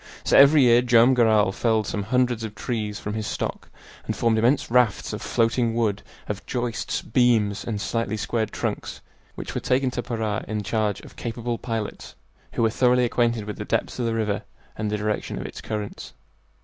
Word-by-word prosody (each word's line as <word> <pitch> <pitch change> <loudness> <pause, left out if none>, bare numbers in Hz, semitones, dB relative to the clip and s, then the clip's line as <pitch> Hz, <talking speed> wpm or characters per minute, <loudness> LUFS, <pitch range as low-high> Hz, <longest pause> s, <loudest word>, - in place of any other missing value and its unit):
So - - +2
every 140 +1 +8
year 120 -1 +6
Joam 120 +1 +5
Garral 110 -5 +4
felled 110 +1 +1
some 105 - -2
hundreds 125 +1 +1
of 110 -2 -6
trees 105 -2 -3
from 105 - -4
his 110 -1 -3
stock - - -4 0.4
and - - -1
formed 115 -1 +2
immense 120 +2 +2
rafts 125 -4 +2
of - - -5
floating 115 0 +1
wood, 105 -3 0 0.3
of 105 0 -4
joists, 120 -2 -2
beams, 110 -4 +2
and 110 -3 -3
slightly 110 0 -2
squared 110 0 -1
trunks, - - -4 0.3
which - - -6
were - - -2
taken 130 0 +1
to 125 - -3
Para 110 -4 -2
in 105 -1 -3
charge 105 -1 -1
of - - -14
capable 120 0 -4
pilots 115 -3 -5 0.4
who - - 0
were 110 - +3
thoroughly 125 +1 +3
acquainted 120 -2 +1
with 105 -1 -6
the - - -2
depths - - -1
of 120 - 0
the 115 - -1
river 105 -3 -1 0.3
and 105 -1 -2
the 105 - -1
direction 105 0 -2
of - - -5
its - - -8
currents. 105 -2 -5
115 Hz, 190 wpm, -24 LUFS, 105-120 Hz, 0.4 s, every